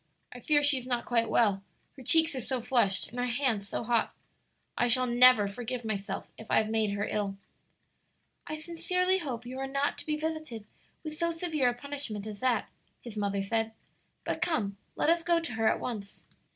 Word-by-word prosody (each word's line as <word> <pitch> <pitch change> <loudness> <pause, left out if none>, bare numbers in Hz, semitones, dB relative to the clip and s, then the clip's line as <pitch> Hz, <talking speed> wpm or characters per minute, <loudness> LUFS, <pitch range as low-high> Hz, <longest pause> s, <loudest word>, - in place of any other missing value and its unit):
I 250 - -9
fear 290 +4 +2
she 285 -2 +4
is 250 - -10
not 245 -2 -1
quite 230 -2 +2
well 205 -4 +3 0.3
her 270 - -11
cheeks 320 +5 +4
are 260 - -3
so 260 +2 -2
flushed 235 -5 +1
and 245 - -7
her 245 - 0
hands 235 -5 0
so - - -3
hot. 230 -1 +1 0.6
I 245 - +2
shall 255 +2 +3
never 245 -3 +6
forgive 240 +3 -5
myself 205 -2 -3
if 220 - -11
I - - +4
have 220 0 +2
made 220 -2 +1
her 205 0 -1
ill." 200 -2 -2 1.1
"I 310 - -3
sincerely 365 +3 0
hope 250 -8 -5
you 255 +2 -6
are 270 - -2
not 275 +1 -1
to - - -8
be 305 0 0
visited 310 -8 -4 0.4
with 310 -1 -4
so 335 +2 0
severe 325 -6 +1
a 240 - -3
punishment 245 -6 -5
as 210 -2 -6
that," 250 -4 +1 0.3
his 235 -3 -9
mother 200 -1 -1
said. 225 +2 -1 0.5
"But 320 - -3
come, 305 - 0 0.2
let - - 0
us 340 0 +2
go 340 0 +2
to 330 -7 -4
her 225 0 +1
at - - +2
once." 205 -5 -6
245 Hz, 205 wpm, -30 LUFS, 220-295 Hz, 1.1 s, never